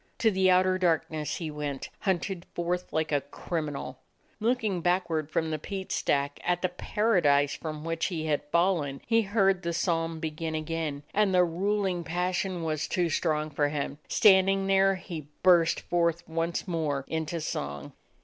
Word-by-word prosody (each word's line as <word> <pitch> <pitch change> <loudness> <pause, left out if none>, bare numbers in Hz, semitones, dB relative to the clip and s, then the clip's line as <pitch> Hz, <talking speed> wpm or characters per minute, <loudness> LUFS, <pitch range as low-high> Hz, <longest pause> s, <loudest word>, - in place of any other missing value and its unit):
To 225 -3 +3
the 190 -1 +3
outer 185 0 +4
darkness 160 -3 0
he 160 -3 -4
went, 145 -2 -4
hunted 190 -2 -1
forth 175 +1 -2
like 160 -1 -1
a 145 -1 +2
criminal. 145 +1 -5 0.4
Looking 220 -5 0
backward 170 -4 0
from 160 0 -1
the 155 - -2
peat 190 +4 -6
stack 140 0 0
at 175 0 0
the 185 - +2
paradise 175 -8 +2
from 155 -2 -6
which 165 0 -1
he 165 -4 -3
had 150 -2 +1
fallen, 170 -6 +1
he 230 -1 +3
heard 195 -3 +2
the 170 0 -2
psalm 165 -1 0
begin 160 0 -3
again, 155 -2 -3
and 205 -2 +3
the 180 - +6
ruling 185 +1 0
passion 180 +1 -1
was 155 -1 -1
too 175 -2 0
strong 155 -1 0
for 145 0 +1
him. 145 0 -3
Standing 195 -2 +5
there 195 0 +4
he 165 -5 -7 0.2
burst 175 -3 +5
forth 170 -1 0
once 165 +3 -2
more 150 -6 -1
into 160 +1 -2
song. 70 - -4
170 Hz, 160 wpm, -28 LUFS, 155-185 Hz, 0.4 s, the